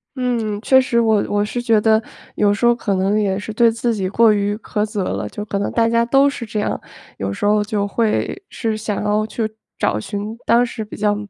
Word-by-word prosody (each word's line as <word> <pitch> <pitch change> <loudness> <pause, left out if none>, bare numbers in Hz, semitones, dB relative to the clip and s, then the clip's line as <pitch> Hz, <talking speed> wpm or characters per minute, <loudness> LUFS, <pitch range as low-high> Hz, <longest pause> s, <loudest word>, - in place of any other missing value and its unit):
嗯， 235 -5 -1
确 260 +2 +5
实， 235 -2 +1
我 220 -3 +3
我 205 0 +1
是 240 +3 -3
觉 225 -2 +3
得 220 +1 +3 0.3
有 205 -1 +3
时 210 - -1
候 240 0 +5
可 205 -4 -1
能 195 +3 +1
也 195 -2 0
是 210 +1 -6
对 230 +1 +4
自 230 +1 -1
己 190 -3 -2
过 225 +2 +4
于 205 0 0
苛 215 -1 -2
责 210 -2 -3
了。 105 - -3
就 210 - -6
可 200 -1 -3
能 200 - -2
大 230 -1 +2
家 230 0 +2
都 275 +3 +4
是 250 -4 -6
这 215 -1 -3
样， 210 - -1 0.4
有 95 0 -3
时 100 - -3
候 210 0 +3
就 205 -1 -1
会 230 - -1
是 225 -2 -2
想 210 -1 -3
要 210 +1 +1
去 220 0 -3 0.3
找 105 - +1
寻 205 - -5
当 235 +1 +4
时 230 -2 -5
比 210 - -10
较 210 0 +1
215 Hz, 250 characters per minute, -19 LUFS, 205-230 Hz, 0.4 s, 确